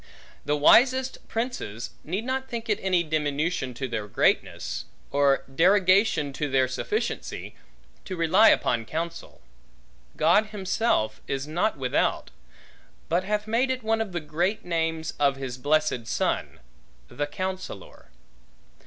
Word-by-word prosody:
The 150 0 +1
wisest 260 - +4
princes 225 - -4
need 190 +8 -3
not 265 +1 -2
think 230 -1 -5
it 210 - +1
any 185 -2 +2
diminution 150 -3 -1
to 130 +2 -3
their 110 -4 -4
greatness, - - 0 0.3
or 140 -1 +3
derogation 185 0 +3
to 145 +1 -2
their 130 -1 +3
sufficiency, 415 - -3 0.5
to 185 - -5
rely 180 +6 +5
upon 115 -2 +2
counsel. 165 +6 -5 0.8
God 175 +7 +4
himself 190 - 0
is 135 +1 -3
not 175 +6 0
without, 130 -2 0 0.8
but 175 +3 +1
hath 210 +1 -1
made 230 +4 +1
it 255 -2 -2
one 225 0 +1
of 220 -3 -3
the 175 - -2
great 175 +9 -1
names 160 -2 -1
of 140 -2 +3
his 130 -2 -6
blessed 145 -4 +1
Son: - - -1 0.5
The 145 0 -3
Counsellor. 185 - -6
165 Hz, 130 wpm, -26 LUFS, 140-210 Hz, 0.8 s, rely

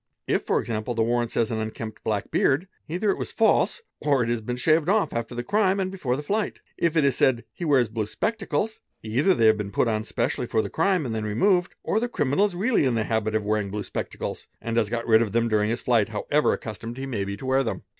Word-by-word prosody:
If, - - +1
for - - +1
example, 115 +1 -3
the 115 - +2
warrant 120 0 0
says—'' 115 -1 0
an 110 - -1
unkempt 110 0 -6
black 105 -2 -2
beard 145 +8 +2 0.2
''—either 190 +6 +1
it - - -3
was - - -3
false, 225 - +2 0.2
or 140 -4 +2
it 115 - -2
has 120 -1 0
been 120 +3 -3
shaved 155 +6 +2
off 210 +1 +2
after 115 +1 -3
the 120 - -3
crime 195 - +2
and 190 -1 -1
before 145 -10 -1
the 145 - -5
flight: 205 +6 -1 0.2
if 165 -1 0
it 150 - +4
is 140 - +2
said—'' 120 -3 +2
he 175 - -5
'wears 135 -6 +4
blue 110 -1 -3
spectacles 220 - -2 0.2
'—either 135 - +2
they 115 - +3
have 110 0 +6
been 100 -2 -3
put 100 - +1
on 110 -1 0
specially 120 - -2
for 110 -1 +1
the - - -6
re 165 - +2
ime 185 -6 +2
and 115 - -3
then 110 -1 -2
removed, 180 - +1
or 215 - +1
the 245 +2 -2
criminal 145 - +2
is 200 -4 -3
really 215 - +2
in 125 -3 +1
the 110 - +1
habit 110 -1 -1
of 110 -1 0
wearing 105 -1 0
© - - -8
blue 105 0 -3
spectacles - - -5
and 115 0 -4
has 110 -3 +2
got 115 0 -2
rid 110 -1 +5
of 105 -3 -1
them 115 0 +2
during 105 -1 +1
his 120 +2 -2
flight, 115 -4 +2
however 145 +8 +1
accus 110 -2 -7
tomed 115 +2 -7
he 135 - -4
may 115 -7 -2
be 100 0 -4
to 130 - -9
wear 130 +1 +3
them. 125 - -3
120 Hz, 265 wpm, -25 LUFS, 110-165 Hz, 0.2 s, have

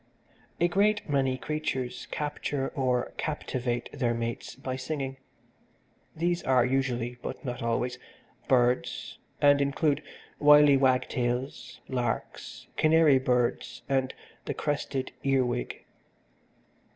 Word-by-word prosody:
"A 175 - +4
great 205 +4 +2
many 135 -3 +1
creatures 130 -5 -3
capture 145 -2 -2
or 125 -3 0
captivate 125 -5 -2
their 120 -1 0
mates 115 0 -4
by 130 -1 -4
singing. 135 0 -4 1.0
These 175 +2 0
are 130 -2 +3
usually, 125 -2 -1
but - - -6
not 125 -1 -4
always, 125 +2 -1 0.5
birds, 125 -1 +1 0.2
and 145 0 +6
include 140 +1 +1 0.4
wily 150 -1 +7
wagtails, 125 -1 0
larks, 120 -3 -3
canary 155 -3 +5
birds 125 -2 0
and 135 -1 +1 0.3
the - - -3
crested 140 -3 -2
earwig. 125 -3 0
130 Hz, 105 wpm, -28 LUFS, 125-145 Hz, 1.0 s, wily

